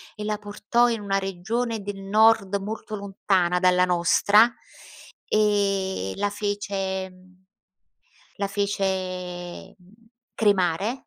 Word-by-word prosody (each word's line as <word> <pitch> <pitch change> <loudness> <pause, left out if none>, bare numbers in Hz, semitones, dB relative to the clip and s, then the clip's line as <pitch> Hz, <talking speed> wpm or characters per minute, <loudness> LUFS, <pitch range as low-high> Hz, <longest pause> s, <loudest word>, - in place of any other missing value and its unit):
e 210 - -6
la 210 0 -1
portò 210 +3 +1
in 230 - -1
una 195 -1 -1
regione 215 +5 -3
del 200 0 -6
Nord, 210 0 +3
molto 215 +2 -6
lontana 190 -3 0
dalla 180 0 +4
nostra, 200 +6 +4 0.7
e 195 - +1
la 205 0 0
fece 200 -2 -3 1.3
la 200 - -2
fece 185 -3 -3 0.6
cremare, 200 +3 +1
200 Hz, 100 wpm, -24 LUFS, 190-210 Hz, 1.3 s, dalla